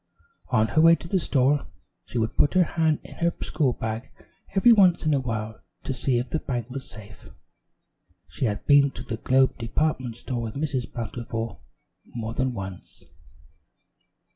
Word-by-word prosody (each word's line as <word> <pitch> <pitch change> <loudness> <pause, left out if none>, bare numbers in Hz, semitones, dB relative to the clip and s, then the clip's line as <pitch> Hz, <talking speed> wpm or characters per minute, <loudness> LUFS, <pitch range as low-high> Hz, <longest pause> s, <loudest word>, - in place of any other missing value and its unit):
On 110 +1 +2
her 155 - +3
way 165 +1 +7
to 170 - -10
the 190 +2 +1
store, 140 - +1 0.4
she - - -5
would 110 0 -1
put 145 - +2
her 185 - +6
hand 160 -2 0
in - - -11
her 170 0 +2
school 135 -6 +1
bag 110 +3 -4 0.5
every 215 +5 +6
once 185 -6 +4
in 155 - +3
a 140 - +3
while 110 -3 -4 0.2
to 135 - -2
see 130 0 0
if 120 +1 -3
the 160 - 0
bank 125 -3 -4
was 135 +1 -6
safe. 105 0 -12 1.0
She 135 - -3
had 105 -3 -2
been 145 -1 +6
to - - -9
the 110 - -4
Globe 130 +3 +2
Department 125 0 -1
Store 120 0 -4
with 115 -2 -5
Mrs. 140 -4 -2
Bountiful 115 -2 -5 0.5
more 115 -1 -4
than 130 0 -1
once. 95 -3 -8
130 Hz, 170 wpm, -25 LUFS, 115-150 Hz, 1.0 s, way